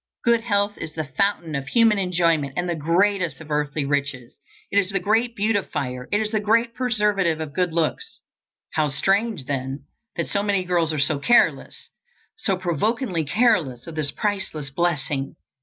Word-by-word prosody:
Good 235 -1 +3
health 205 -2 0
is 155 - -6
the 155 - -3
fountain 185 -4 +1
of 140 -1 -3
human 225 - +4
enjoyment 170 -6 +1
and 180 0 0
the 175 - 0
greatest 175 +1 +1
of 155 -1 -11
earthly 150 0 -1
riches. 140 -3 -2 0.4
It 200 - +4
is 190 -2 0
the 195 -1 0
great 225 +5 +1
beautifier; 150 - -2
it 205 - +2
is 215 -1 -1
the 215 - +1
great 230 +3 +2
preservative 210 -9 +1
of 155 -3 -5
good 180 +1 0
looks. 170 - -2 0.5
How 155 -2 +1
strange, 195 - 0
then, 135 0 -4 0.3
that - - -2
so 200 - 0
many 200 -2 +1
girls 175 -3 +1
are 155 - -2
so 145 0 +1
careless, 240 +12 +2 0.4
so 195 - 0
provokingly 185 - -1
careless, 150 - +1
of 165 - -8
this 155 -2 -1
priceless 190 -9 -3
blessing! 145 -4 -1
175 Hz, 170 wpm, -23 LUFS, 150-205 Hz, 0.5 s, human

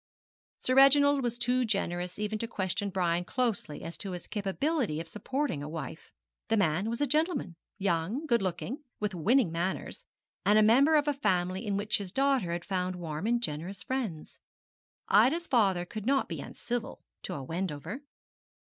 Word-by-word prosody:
Sir 255 - +1
Reginald 280 +1 +6
was 240 -1 -1
too 245 +1 +2
generous 180 -5 -1
even 210 +1 -2
to 230 - -2
question 200 -2 -1
Brian 175 -2 0
closely 215 - -2
as 165 - -6
to 195 -2 -4
his 175 - -6
capability 210 - -1
of 165 - -6
supporting 255 - -2
a 145 - -5
wife. 165 0 -7 0.4
The 225 - +2
man 190 +2 +1
was 235 +4 -2
a - - +4
gentleman 305 - 0 0.2
young, 195 - -1
good 235 -7 +2
looking, 195 - -3 0.2
with 210 -2 -1
winning 205 - +3
manners, 175 +3 -3 0.4
and 205 +2 +5
a 215 - +6
member 270 +9 +5
of 295 -1 +3
a 295 - +3
family 190 -4 0
in 200 -1 0
which 210 +1 0
his 195 -3 -5
daughter 270 -9 +2
had 170 0 -3
found 185 -1 -1
warm 170 +2 -4
and 240 0 +1
generous 175 +2 -4
friends. 225 -13 -4 0.7
Ida's 260 - +4
father 195 - +2
could 215 +4 -6
not 270 0 +2
be - - -5
uncivil 240 -1 -5 0.2
to - - -5
a 140 - -5
Wendover. 165 - -4
205 Hz, 170 wpm, -30 LUFS, 175-255 Hz, 0.7 s, Reginald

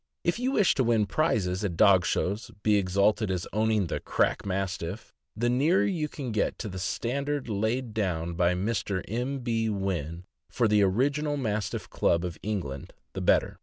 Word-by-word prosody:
If 170 +6 0
you 260 +2 0
wish 205 -7 +4
to 130 - +1
win 115 -3 +3
prizes 100 - 0
at 90 -5 -2
dog 95 -4 +5
shows, 100 +4 -1
be 105 -1 +4
exalted 100 +3 +2
as 90 -2 -2
owning 110 -1 +2
"that - - -4
crack - - 0
Mastiff,'' 95 0 -3 0.2
the 120 +2 0
nearer 145 +10 +3
you 165 -6 -1
can 135 -5 -5
get 105 -2 0
to 110 - -5
the 95 0 -6
stand 135 +9 -2
ard 145 -3 -2
laid 110 +3 -1
down 85 -6 -1
by 90 +1 +2
Mr. 100 -1 -1
M. 125 +5 -2
B. 115 -2 0
Wynn 90 -5 -3 0.3
for 120 -2 +1
the 105 -1 +4
original 140 +9 +1
Mastiff 110 -6 -2
Club 85 +1 +1
of 85 -2 -6
England 85 -11 -4 0.2
the - - -4
better. - - +2
105 Hz, 180 wpm, -28 LUFS, 95-125 Hz, 0.3 s, dog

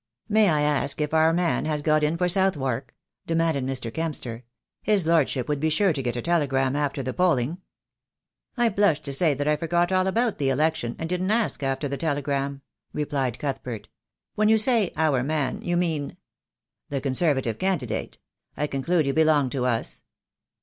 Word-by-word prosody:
"May 215 -1 +4
I 150 -2 +2
ask 145 -1 +1
if 150 0 -2
our 160 0 +4
man 170 0 0
has 150 -1 -2
got 155 0 +3
in 150 +2 +1
for 180 +1 +1
Southwark?" 140 - 0 0.3
demanded 165 -5 0
Mr. 125 -4 -3
Kempster. 135 -8 -3 0.4
"His 205 -5 +2
lordship 150 -6 +1
would 150 -1 -1
be 160 +2 +1
sure 185 +3 +2
to 140 - -3
get 125 -2 -2
a 120 - -4
telegram 135 -6 +1
after 145 -2 -1
the 130 0 -3
polling." 170 -3 +1 1.0
"I 240 -1 +3
blush 200 -7 +2
to 140 -2 -4
say 150 +1 +3
that 145 +2 -2
I 150 - +3
forgot 175 +3 0
all 185 0 +2
about 225 +1 0
the 135 -2 +1
election, 150 -3 0
and 165 - -4
didn't 180 +2 -1
ask 225 -5 0
after 135 +1 -1
the 140 0 -4
telegram," 140 -2 -2 0.3
replied 140 -5 -2
Cuthbert. 125 -6 -5 0.4
"When 215 0 +2
you 220 - +5
say 220 -3 +2
'our 150 -5 +2
man,' 140 -1 -1
you 175 0 -1
mean 160 -5 -2 0.4
" - - -61
"The 140 - -2
Conservative 135 -4 +1
candidate. 145 - -2 0.4
I 150 - 0
conclude 150 +3 0
you 135 - 0
belong 155 -4 +3
to 125 -2 -1
us." 115 -2 -2
150 Hz, 180 wpm, -25 LUFS, 135-170 Hz, 1.0 s, you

